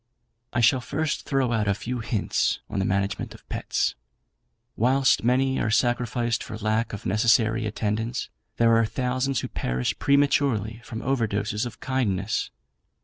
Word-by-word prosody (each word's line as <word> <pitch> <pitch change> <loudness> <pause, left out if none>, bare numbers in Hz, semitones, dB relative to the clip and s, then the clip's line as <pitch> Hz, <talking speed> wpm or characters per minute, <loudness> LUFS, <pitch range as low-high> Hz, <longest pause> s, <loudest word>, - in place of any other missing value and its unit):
"I 120 - 0
shall 125 +3 +4
first 150 +5 -2
throw 135 -3 +1
out 110 -3 +1
a 100 - +2
few 120 +4 -4
hints 110 -2 0
on - - -1
the 95 - +1
Management 100 +1 -1
of - - -18
Pets. - - -1 0.8
Whilst 130 +3 +3
many 130 +2 +2
are 110 - 0
sacrificed 120 0 +1
for 110 - -7
lack 110 +2 0
of 105 +2 -7
necessary 110 +2 +3
attendance, 110 +3 -2 0.3
there 115 -1 +5
are 115 0 +4
thousands 130 +2 -1
who - - -4
perish 60 0 -2
prematurely 140 -6 +2
from 115 -2 -7
overdoses 110 -3 0
of 120 - -11
kindness. 110 -6 -1
115 Hz, 145 wpm, -25 LUFS, 110-125 Hz, 0.8 s, there